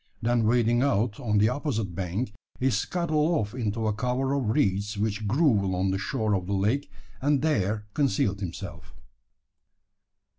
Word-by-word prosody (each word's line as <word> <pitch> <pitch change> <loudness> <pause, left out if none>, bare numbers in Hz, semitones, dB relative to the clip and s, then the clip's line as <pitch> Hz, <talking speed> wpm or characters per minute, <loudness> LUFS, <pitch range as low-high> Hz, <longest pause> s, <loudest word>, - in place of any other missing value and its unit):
Then 120 0 +1
wading 120 0 +3
out 115 -4 +1
on 120 -6 -2
the 105 - +5
the - - +4
opposite 125 - -2
bank, 95 +6 -3 0.3
he 130 +1 +2
scuttled 155 - 0
off 105 -6 -2
into 115 -2 -2
a 110 - +1
cover 125 +4 -1
of 135 -6 0
reeds 105 -5 +1
which 105 0 -1
grew 125 -3 +3
along 95 0 0
the 95 - -1
shore 105 +1 -1
of 95 -2 -1
the 100 - 0
lake, 110 +8 0 0.3
and 145 +1 +2
there 105 -8 +1
concealed 100 -8 +1
himself. 90 -4 -7
110 Hz, 160 wpm, -27 LUFS, 100-130 Hz, 0.3 s, the